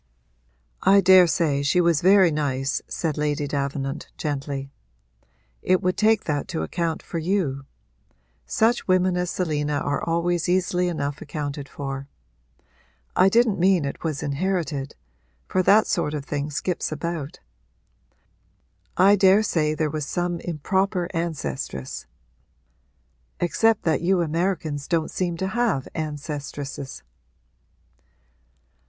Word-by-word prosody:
'I 200 Hz, +1 st, +6 dB
daresay 170 Hz, -6 st, +5 dB
she 145 Hz, +6 st, +2 dB
was 170 Hz, -3 st, +3 dB
very 190 Hz, -1 st, +6 dB
nice,' 140 Hz, -2 st, -1 dB
said 155 Hz, -3 st, -2 dB
Lady 150 Hz, 0 st, 0 dB
Davenant 140 Hz, 0 st, -3 dB
gently. 140 Hz, -2 st, -4 dB, 0.9 s
'It 185 Hz, 0 st, +3 dB
would 185 Hz, 0 st, +1 dB
take 220 Hz, 0 st, +3 dB
that 145 Hz, -2 st, -2 dB
to 165 Hz, -, -3 dB
account 170 Hz, -2 st, -2 dB
for 170 Hz, -, -4 dB
you: 160 Hz, -6 st, -1 dB, 0.8 s
such 230 Hz, +2 st, +1 dB
women 185 Hz, -1 st, +3 dB
as 180 Hz, 0 st, -1 dB
Selina 150 Hz, -5 st, -1 dB
are 145 Hz, 0 st, -1 dB
always 170 Hz, +1 st, 0 dB
easily 180 Hz, 0 st, +1 dB
enough 145 Hz, -4 st, -3 dB
accounted 145 Hz, -2 st, -5 dB
for. 135 Hz, -1 st, -5 dB, 1.1 s
I 190 Hz, -, +5 dB
didn't 225 Hz, -2 st, +3 dB
mean 180 Hz, -3 st, +3 dB
it 140 Hz, -, -5 dB
was 155 Hz, -3 st, -2 dB
inherited 150 Hz, -2 st, -2 dB, 0.5 s
for 185 Hz, -, +1 dB
that 205 Hz, +4 st, +5 dB
sort 155 Hz, -5 st, -1 dB
of 140 Hz, -2 st, -5 dB
thing 145 Hz, 0 st, -3 dB
skips 165 Hz, +4 st, -2 dB
about. 155 Hz, -2 st, -4 dB, 1.6 s
I 195 Hz, +2 st, +6 dB
daresay 190 Hz, -6 st, +3 dB
there 155 Hz, -1 st, -1 dB
was 150 Hz, -1 st, -3 dB
some 175 Hz, -1 st, -2 dB
improper 180 Hz, +3 st, -1 dB
ancestress 140 Hz, -, -4 dB, 1.3 s
except 225 Hz, +5 st, +2 dB
that 155 Hz, -4 st, +1 dB
you 180 Hz, +1 st, +2 dB
Americans 160 Hz, -3 st, -2 dB
don't 165 Hz, -2 st, 0 dB
seem 175 Hz, -2 st, -2 dB
to 190 Hz, +2 st, -2 dB
have 220 Hz, -, 0 dB
ancestresses.' 145 Hz, -, -5 dB
165 Hz, 120 wpm, -24 LUFS, 145-185 Hz, 1.6 s, I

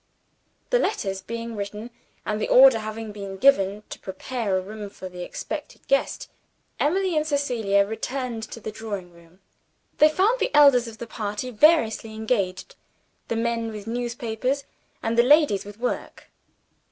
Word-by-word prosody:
The -, -, +4 dB
letters 195 Hz, -, -1 dB
being 230 Hz, +2 st, -6 dB
written 210 Hz, +3 st, -6 dB, 0.3 s
and 215 Hz, 0 st, -2 dB
the -, -, 0 dB
order 260 Hz, -3 st, +8 dB
having 215 Hz, 0 st, -6 dB
been 200 Hz, -2 st, -7 dB
given 205 Hz, -4 st, +3 dB
to -, -, -7 dB
prepare 200 Hz, +1 st, -3 dB
a -, -, -1 dB
room 210 Hz, +1 st, -7 dB
for 190 Hz, -1 st, -9 dB
the 180 Hz, -1 st, -9 dB
expected -, -, -7 dB
guest -, -, 0 dB, 0.5 s
Emily 365 Hz, +3 st, +1 dB
and 305 Hz, 0 st, +1 dB
Cecilia 235 Hz, -9 st, +1 dB
returned 235 Hz, +2 st, -4 dB
to -, -, -8 dB
the 215 Hz, -, -6 dB
drawing 205 Hz, -5 st, -6 dB
room. 170 Hz, +2 st, -20 dB, 0.6 s
They 305 Hz, -, +8 dB
found 400 Hz, +10 st, +2 dB
the 430 Hz, -, +1 dB
elders 275 Hz, -5 st, +6 dB
of 225 Hz, -1 st, -9 dB
the 235 Hz, -, -6 dB
party 215 Hz, +2 st, -4 dB
variously 225 Hz, -4 st, +3 dB
engaged 205 Hz, -4 st, -2 dB, 0.5 s
the 230 Hz, -, -2 dB
men 230 Hz, 0 st, -1 dB
with 210 Hz, -2 st, -8 dB
newspapers, 240 Hz, +3 st, -2 dB, 0.4 s
and 230 Hz, +1 st, +1 dB
the -, -, +10 dB
ladies 280 Hz, -6 st, +4 dB
with 205 Hz, 0 st, -10 dB
work. 245 Hz, +1 st, -4 dB
225 Hz, 155 wpm, -24 LUFS, 205-255 Hz, 0.6 s, the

